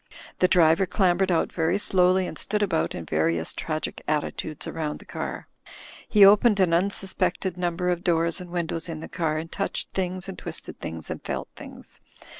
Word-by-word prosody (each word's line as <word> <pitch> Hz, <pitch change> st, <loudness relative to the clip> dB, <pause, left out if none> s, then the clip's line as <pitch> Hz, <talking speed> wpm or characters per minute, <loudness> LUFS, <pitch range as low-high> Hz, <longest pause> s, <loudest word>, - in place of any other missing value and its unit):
The 185 Hz, -, +5 dB
driver 175 Hz, 0 st, +4 dB
clambered 185 Hz, 0 st, +2 dB
out 165 Hz, -, +1 dB
very 165 Hz, +3 st, +1 dB
slowly, 185 Hz, -2 st, +3 dB
and -, -, -6 dB
stood 210 Hz, 0 st, -1 dB
about 85 Hz, -, 0 dB
in 85 Hz, -, -6 dB
various 80 Hz, +1 st, 0 dB
tragic 155 Hz, -1 st, -4 dB
attitudes 155 Hz, 0 st, -2 dB
round 155 Hz, -2 st, -3 dB
the -, -, -15 dB
car. -, -, -5 dB, 0.6 s
He 210 Hz, -3 st, +7 dB
opened 205 Hz, +1 st, +6 dB
an 180 Hz, -3 st, +3 dB
unsuspected 190 Hz, 0 st, 0 dB
number 180 Hz, 0 st, -1 dB
of 175 Hz, 0 st, -1 dB
doors 170 Hz, 0 st, +1 dB
and 180 Hz, -, -9 dB
windows 170 Hz, -1 st, -2 dB
in 160 Hz, -1 st, -5 dB
the -, -, -7 dB
car, 155 Hz, -2 st, -1 dB
and 165 Hz, +1 st, -5 dB
touched 195 Hz, -, -3 dB
things 185 Hz, 0 st, -3 dB
and 190 Hz, -, -7 dB
twisted -, -, -8 dB
things 80 Hz, -1 st, -6 dB
and -, -, -6 dB
felt -, -, -4 dB
things. -, -, -12 dB
175 Hz, 180 wpm, -25 LUFS, 160-190 Hz, 0.6 s, He